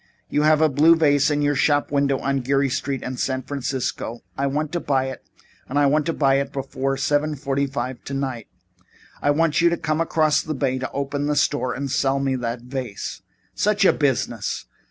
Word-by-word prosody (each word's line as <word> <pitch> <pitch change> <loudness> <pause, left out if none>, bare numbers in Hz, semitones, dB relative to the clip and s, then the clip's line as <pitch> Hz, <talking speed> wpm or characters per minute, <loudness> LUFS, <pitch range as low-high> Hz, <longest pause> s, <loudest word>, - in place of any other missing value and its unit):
You 150 - +1
have 155 0 +4
a 160 - +6
blue 155 +4 +5
vase 145 -2 +3
in 145 -1 0
your 145 0 +2
shop 145 +1 +2
window 140 -1 +2
on 135 +1 -1
Geary 135 +2 +1
Street 135 -1 -2
in 130 0 -5
San 130 +1 -1
Francisco. 130 -3 -3
I 140 - 0
want 150 +2 -2
to 175 - -1
buy 135 -4 0
it - - -9 0.5
and 140 - -2
I 145 - +4
want 150 +3 +2
to - - +2
buy 135 -3 +3
it 140 0 -3
before 135 0 -2
seven 150 +1 +1
forty 140 0 -1
five 130 -2 -4
tonight. 135 -5 -4 0.7
I - - +1
want 155 +2 +2
you 170 - +5
to 170 - -1
come 155 +4 -1
across 155 -2 +2
the 155 - -4
bay 135 -1 0
and 130 0 -2
open 140 +1 -2
the 150 - +1
store 140 -3 +1
and 135 0 -4
sell 135 0 +1
me 135 -1 0
that 120 -1 -3
vase." 125 -4 -5 0.3
"Such 210 0 +2
a - - +6
business! 120 -7 -1
140 Hz, 205 wpm, -23 LUFS, 130-150 Hz, 0.7 s, a